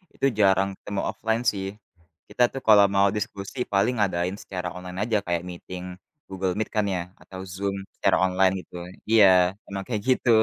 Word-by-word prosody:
itu - - -1
jarang 95 -1 +4
ketemu 100 -1 -4
offline 110 +2 -1
sih. 95 -2 -5 0.6
Kita 125 - +1
tuh 135 - -5
kalau 105 -2 +8
mau 100 0 +5
diskusi 100 +1 -5 0.2
paling 100 +6 +3
ngadain 90 -2 0
secara 90 -2 -5
online 90 0 -8
aja 110 -2 +1
kayak 85 -1 -1
meeting 90 +1 -8 0.5
Google 95 -1 -2
Meet 110 - -1
kan 105 -1 +2
ya 90 - -1 0.2
atau 95 - -10 0.2
Zoom 100 +1 -2 0.2
secara - - +2
online 95 0 +3
gitu. - - -16 0.3
Iya 110 -2 +7 0.4
emang 100 -1 -4
kayak 110 -4 -2
gitu. 130 -1 +2
100 Hz, 175 wpm, -25 LUFS, 90-105 Hz, 0.6 s, kalau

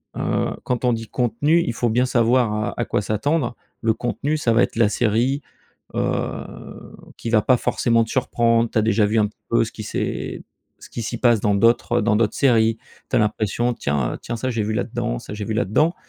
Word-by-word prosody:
Heu, - - -1
quand 125 -1 -2
on 125 - +3
dit 115 0 -4
contenu, 130 +9 +1
il 120 - -2
faut 120 +1 0
bien 125 +3 +2
savoir 120 -1 +2
à 105 0 -2
à 120 - 0
quoi 105 - 0
s'attendre. 120 +5 -1 0.3
Le 110 -1 +2
contenu, 135 +6 -2
ça 125 -6 +1
va 115 - +4
être - - -2
la 115 -2 +3
série, 120 +6 +1 0.5
heu, - - -2 0.7
qui 115 - -5
va 110 -2 +4
pas 125 +4 +4
forcément 115 -1 +1
te 115 - -11
surprendre. 115 -2 +2
Tu - - -15
as - - +3
déjà 110 -1 +3
vu 110 +2 +1
un 105 - +3
petit 105 - -13
peu - - +3
ce - - -8
qui - - -7
s'est - - -4 0.4
ce - - -12
qui 120 - -5
s'y 115 +2 -4
passe 120 -4 +3
dans 105 0 +2
d'autres 115 +3 +3
dans 105 0 +2
d'autres 110 -1 +1
séries. 115 -4 +3 0.3
Tu - - +1
as - - +5
l'impression: 110 +3 0
«Tiens, 70 - -1
heu, - - -7
tiens 120 - -5
ça 130 +3 -2
j'ai 115 -3 -1
vu 105 - -2
là-dedans, - - -2
ça, - - -9
j'ai 105 0 -5
vu 110 - -2
là-dedans». 125 - +2
115 Hz, 225 wpm, -22 LUFS, 110-125 Hz, 0.7 s, as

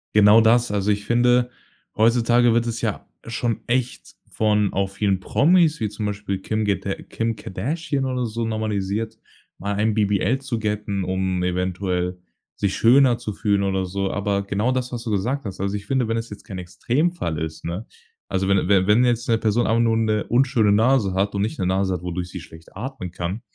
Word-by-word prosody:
Genau 105 +1 +7
das. 115 +1 +3
Also, 100 0 0
ich 105 0 -2
finde, 120 +2 +3 0.5
heutzutage 120 +1 +4
wird 115 0 +2
es 115 -1 -3
ja - - -3 0.2
schon 115 0 -2
echt 125 0 -2 0.2
von 105 -2 +1
auch 95 0 0
vielen 95 -1 0
Promis 160 - +3
wie 110 - -1
zum 105 +1 -5
Beispiel 100 -1 -3
Kim 110 +2 -1
Gada 100 -3 -1 0.2
Kim 115 0 -2
Kardashian 135 - -3
oder 125 -1 -1
so 115 +1 -3
normalisiert, 110 0 -2 0.4
mal 100 +2 -2
ein 105 +2 +1
BBL 105 +3 +1
zu 135 -3 -3
getten, 105 -2 -2
um 95 0 -1
eventuell 90 0 -1 0.4
sich 100 -2 -1
schöner 125 +1 +5
zu 110 -3 -5
fühlen 100 -1 +1
oder 95 -1 0
so. 95 +1 -2
Aber 100 -1 -1
genau 105 +5 0
das, 130 -1 -2
was 120 -2 -5
du 115 - -3
gesagt 120 +8 -1
hast. 95 -2 -6
Also 100 +1 -1
ich 105 0 -5
finde, 130 -2 0
wenn 115 +1 0
es 115 0 -4
jetzt 105 - -10
kein 100 -4 -7
Extremfall 90 - -1
ist, 80 -1 -5
ne? 90 +6 -4 0.4
Also, 95 0 -1
wenn 100 -2 +2
wenn 95 -1 +3
wenn 110 +4 +5
jetzt 120 -1 0
'ne 115 - +4
Person 110 +2 +1
einfach 115 +1 +2
nur 115 -1 +2
'ne 110 -2 +1
unschöne 120 -4 +3
Nase 110 -1 +3
hat 100 +2 0
und 100 - 0
nicht 110 +3 -2
'ne 95 - 0
Nase 95 0 +1
hat, 90 - -4
wodurch 90 0 -4
sie 95 - -7
schlecht 80 +1 -15
atmen 130 -9 -6
kann, 90 +4 -4
105 Hz, 200 wpm, -22 LUFS, 95-120 Hz, 0.5 s, Genau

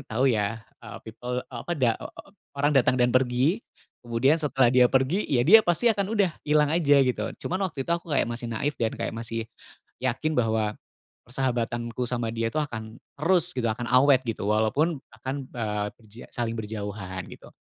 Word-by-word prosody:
tau, 125 +1 -1
ya, 110 -1 0 0.2
eee, 105 -2 -8
people, 125 +3 -4
eee, 125 - -11
apa, 175 - -3
da 120 -3 +3
o - - -6
o - - -13 0.3
orang 145 +1 +2
datang 130 -2 +3
dan 125 -1 +2
pergi, 130 - +2 0.4
kemudian 120 +5 +2
setelah 135 -4 +3
dia 125 -1 +6
pergi, 135 +11 +1
ya, 130 -5 +2
dia 215 - +9
pasti 175 +8 +2
akan 200 -2 -1
udah, 200 -5 +2
hilang 150 0 +3
aja, 145 -4 +4
gitu, 115 -4 -1 0.2
cuman 185 +2 -1
waktu 145 -4 -8
itu - - -7
aku 170 -3 -8
kayak 135 - +2
masih 120 0 -4
naif 140 +6 -1
dan 115 - +1
kayak - - -3
masih 115 0 -4 0.6
yakin 140 +5 0
bahwa 110 -3 +1 0.5
persahabatanku 120 -1 -2
sama 120 -2 -2
dia 115 0 -1
itu 155 - -1
akan 110 -6 -5 0.2
terus, 175 +2 +3
gitu, 120 - 0
akan 120 +2 -5
awet, 130 +1 +5
gitu, 115 -3 -4
walaupun 130 +9 +1 0.2
akan, 135 0 -4
eee, 105 -3 -2
berja 110 +1 -13
saling 115 -1 -2
berjauhan, 100 -3 -6
gitu. - - -12
125 Hz, 185 wpm, -26 LUFS, 115-145 Hz, 0.6 s, dia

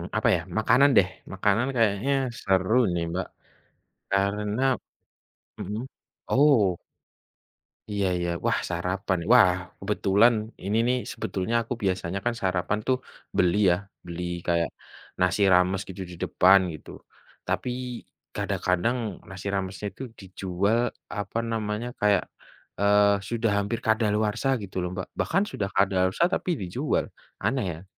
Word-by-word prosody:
Apa, - - +2
ya? - - -1 0.2
Makanan, 140 +6 +5
deh, 95 -2 +6 0.3
makanan 105 +6 +1
kayaknya 115 +3 +2 0.3
seru, 95 +3 +2 0.2
nih, 85 -1 -1
Mbak, 90 +1 -2 0.8
karena 105 +4 0 1.0
mhm, 105 +4 -4 0.5
oh. 130 -10 +4 1.2
Iya, 100 -2 0 0.2
ya, 85 - -1 0.2
wah, - - +2
sarapan 90 +2 -1
wah, 105 -8 +7 0.3
kebetulan 105 +3 +3 0.3
ini 100 +3 0
nih 125 +1 +2
sebetulnya 95 +5 -3
aku - - -1
biasanya, 95 -1 -1
kan, 120 - +3
sarapan, 95 +2 0
tuh, 130 -1 +3 0.4
beli, 90 +2 +3
ya, - - +4 0.3
beli 85 0 -5 0.2
kayak 85 -1 +2 0.5
nasi 90 +2 +2
rames 90 +1 +3
gitu 95 0 -7
di - - -8
depan 95 +2 +5
gitu. 80 - -10 0.6
Tapi, - - -1 0.7
kadang-kadang 95 +7 0 0.3
nasi 95 0 -9
ramesnya 95 +1 -3
itu 115 - -9 0.2
dijual 95 +3 -1 0.3
apa 100 +1 -4
namanya 110 +1 -2
kayak, 105 -1 +3 0.6
eee, 100 0 +5
sudah 115 -2 0
hampir 105 +3 -2
kadaluarsa 110 +1 +1 0.2
gitu 95 - -10
loh 90 - -2
Mbak, 95 - -4
bahkan 195 +4 +2
sudah 100 - -2
kadaluarsa 95 - +2
tapi - - -1
dijual, 90 -2 -1 0.4
aneh, 130 -5 +1
ya. 85 - -12
100 Hz, 125 wpm, -26 LUFS, 95-110 Hz, 1.2 s, wah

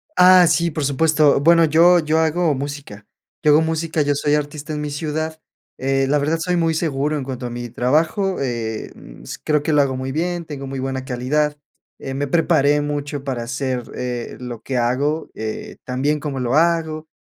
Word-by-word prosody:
Ah, 180 0 +7
sí, 170 +1 +2
por 150 -2 -3
supuesto. 150 +1 +3
Bueno, 165 +2 +5
yo 170 +3 +5
yo 155 0 +1
hago 160 0 +2
música, 140 -7 -7 0.4
yo 150 - +5
hago 150 +2 +6
música, 160 0 -1
yo 145 0 +1
soy 145 +1 +1
artista 150 +1 -4
en 150 - -3
mi 150 - -4
ciudad, 155 +2 -3 0.4
eh, 135 +1 +1
la 145 +1 +2
verdad, 155 +3 0
soy 180 +2 0
muy 165 -2 +1
seguro 150 -2 -1
en 140 - -3
cuanto 125 -2 -5
a - - -5
mi 120 0 -5
trabajo, 160 - 0
eh, 115 -4 -3
mm, - - -14
s - - -7
creo 150 -1 +1
que 155 0 0
lo 145 - +5
hago 135 -2 0
muy 130 0 -4
bien, 170 +2 -2
tengo 140 -3 -7
muy 135 0 -5
buena 130 0 -3
calidad, 145 +4 -1 0.4
eh, 135 - -6
me 140 +1 -2
preparé 150 -2 +3
mucho 145 -1 -4
para 130 -4 -3
hacer, 130 0 -3
eh, 125 -1 -4
lo 120 -3 -7
que 130 +1 -3
hago, 140 +6 0
eh, 110 0 -6
también 140 +4 -1
cómo 140 -2 -4
lo 125 -1 -1
hago, 160 0 +1
145 Hz, 200 wpm, -20 LUFS, 130-160 Hz, 0.4 s, Ah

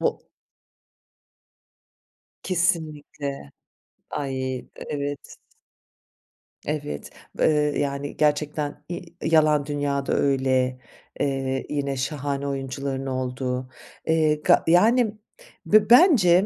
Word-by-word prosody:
vo - - 0 2.2
Kesinlikle, 155 - -2 0.6
ay, 130 -2 -3
e - - -12 0.2
evet. 145 -1 -5 1.3
Evet. 145 - -4 0.3
Iıı, 150 -1 +2
yani, 140 0 -3
gerçekten 150 -1 0
i 175 +1 -5 0.2
Yalan 155 -2 +3
Dünya 145 -1 -1
da - - -1
öyle, 130 -2 +1 0.4
eee, 135 -1 -1
yine 140 -2 -2
şahane 140 0 -2
oyuncuların 135 0 -3
olduğu, 130 0 -3 0.4
eee, 155 -1 +3
ga - - +5
yani 220 +6 +4 0.5
ve 215 0 +5
bence 235 - +6
145 Hz, 90 wpm, -24 LUFS, 135-155 Hz, 2.2 s, bence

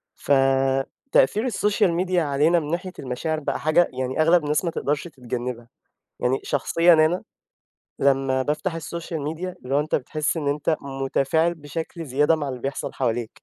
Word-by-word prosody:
فتأثير 135 - +2
السوشيال 210 -5 +1
ميديا 180 0 +1
علينا، 150 +4 +3
من 150 -1 -5
ناحية 180 +2 -2
المشاعر 150 +5 -2
بقى 145 - -2
حاجة 165 +3 +3
يعني، 130 +3 -1
أغلب 165 +1 +4
الناس 150 +4 0
ما 170 - 0
تقدرش 150 -1 -1
تتجنَّبها. 125 -4 -5 0.5
يعني 130 +2 +1
شخصيًا 165 +4 +3
أنا، 160 +3 +3 0.8
لمَّا 135 -1 +2
بافتح 150 +5 -2
السوشيال 165 -1 -5
ميديا، 165 +5 -4
اللي 135 +2 -2
هو 145 - +4
أنت 150 +1 -3
بتحِس 150 +4 -1
إن 150 -3 -1
أنت 150 +2 0
متفاعل 140 +4 0
بشكل 160 +2 -6
زيادة 145 +3 +2
مع 145 -2 -3
اللي 130 -2 -5
بيحصل 135 0 -4
حواليك. 120 -3 -3
150 Hz, 155 wpm, -24 LUFS, 135-165 Hz, 0.8 s, أغلب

